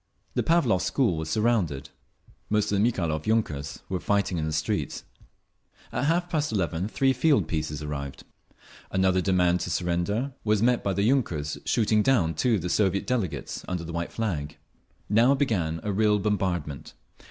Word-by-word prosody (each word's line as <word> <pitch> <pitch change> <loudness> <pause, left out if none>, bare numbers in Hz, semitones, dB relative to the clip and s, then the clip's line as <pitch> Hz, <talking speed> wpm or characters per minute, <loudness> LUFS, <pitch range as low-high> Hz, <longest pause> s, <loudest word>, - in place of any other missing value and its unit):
The - - +1
Pavlovsk 135 - +2
school 120 -11 +1
was 80 0 -4
surrounded. 100 - 0 0.6
Most 105 -1 +1
of 100 - +2
the - - +3
Mikhailov 80 -7 -2
yunkers 80 -11 -1
were 95 - -2
fighting 100 -3 0
in 80 - -1
the - - -2
streets…. 75 +1 -2 0.9
At - - -1
half 175 +3 +1
past 155 -5 -1
eleven 90 -2 -1
three 135 +4 +2
field 135 - +2
pieces 75 -2 -3
arrived. 70 -2 -5 0.7
Another 95 -1 +2
demand 90 -1 +2
to - - -3
surrender 90 +10 -1
was 105 -1 +2
met 125 0 +3
by 100 - 0
the 100 - 0
yunkers 85 - 0
shooting 110 -1 +3
down 105 -10 +2
two 115 +9 +2
of 95 - -3
the - - -1
Soviet 100 0 +1
delegates 115 - -2
under 90 -2 -3
the 85 0 -7
white 85 0 -3
flag. 80 -10 -3 0.5
Now 120 +6 +4
began 90 - 0
a 105 - -1
real 105 +1 +3
bombardment. 95 -8 -2
95 Hz, 165 wpm, -26 LUFS, 80-115 Hz, 0.9 s, Now